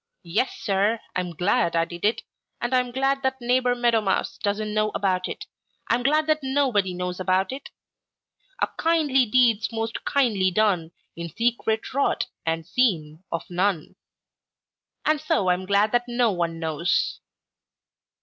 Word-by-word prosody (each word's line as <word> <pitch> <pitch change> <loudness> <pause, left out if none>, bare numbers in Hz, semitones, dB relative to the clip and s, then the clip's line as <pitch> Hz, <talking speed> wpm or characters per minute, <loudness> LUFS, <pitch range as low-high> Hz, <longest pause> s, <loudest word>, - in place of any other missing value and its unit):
'Yes, 175 +9 -1
Sir, 205 +2 +1 0.2
I'm 180 -2 -2
glad 170 -1 +1
I 165 0 +3
did 175 0 -10
it, 215 +3 +1 0.4
and 240 +2 -2
I'm 250 -1 +2
glad 270 +2 0
that 265 -1 -1
Neighbor 245 0 +2
Meadow 240 -2 +2
Mouse 195 -2 -1
doesn't 210 0 -2
know 215 0 +2
about 185 -2 0
it. 425 - -6 0.5
I'm 235 +1 +2
glad 300 +4 +2
that 310 0 +2
nobody 260 -9 +1
knows 180 0 -4
about 185 +2 +1
it. 270 +2 -7 0.9
'A - - +2
kindly 300 -6 +3
deed's 230 -2 +3
most 225 0 -3
kindly 220 -9 +2
done 185 -4 +1 0.2
In 170 0 -6
secret 230 +3 -1
wrought, 280 +1 +1 0.2
and 165 0 -1
seen 170 -7 0
of 170 - -3
none. 180 -1 -1 1.1
And 305 -2 +2
so 205 -11 +1
I'm 180 +1 0
glad 200 +2 +3
that 245 0 +2
no 240 -2 +2
one 170 -3 -2
knows.' 160 +1 0
215 Hz, 150 wpm, -24 LUFS, 180-250 Hz, 1.1 s, I